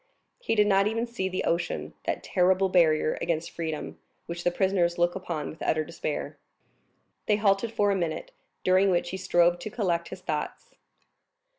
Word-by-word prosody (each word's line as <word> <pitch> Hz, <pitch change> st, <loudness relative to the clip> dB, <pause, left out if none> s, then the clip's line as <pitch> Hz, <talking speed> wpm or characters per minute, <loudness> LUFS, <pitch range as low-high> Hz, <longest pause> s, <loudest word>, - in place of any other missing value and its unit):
He -, -, -1 dB
did 210 Hz, -1 st, +5 dB
not 195 Hz, 0 st, +4 dB
even 230 Hz, +2 st, -1 dB
see 230 Hz, -6 st, -3 dB
the 185 Hz, -, -2 dB
ocean, 165 Hz, -, -1 dB
that -, -, -2 dB
terrible 185 Hz, +1 st, +2 dB
barrier 155 Hz, -4 st, +3 dB
against 170 Hz, 0 st, -1 dB
freedom, 160 Hz, -2 st, -5 dB, 0.3 s
which 170 Hz, 0 st, -6 dB
the -, -, +3 dB
prisoners 175 Hz, -2 st, +1 dB
look 175 Hz, 0 st, +2 dB
upon 170 Hz, -5 st, -4 dB
with 160 Hz, -, -14 dB
utter 155 Hz, 0 st, +1 dB
despair. 155 Hz, -2 st, -5 dB, 0.9 s
They 210 Hz, -, +4 dB
halted 205 Hz, +1 st, +2 dB
for 205 Hz, -2 st, +2 dB
a -, -, +2 dB
minute, 170 Hz, -4 st, -3 dB, 0.3 s
during 185 Hz, +2 st, +4 dB
which 175 Hz, -1 st, +1 dB
he 190 Hz, -, -3 dB
strove 175 Hz, -1 st, +3 dB
to 215 Hz, -, -5 dB
collect 175 Hz, -6 st, -1 dB
his 185 Hz, -, -8 dB
thoughts. 150 Hz, -4 st, -4 dB
180 Hz, 170 wpm, -27 LUFS, 170-195 Hz, 0.9 s, did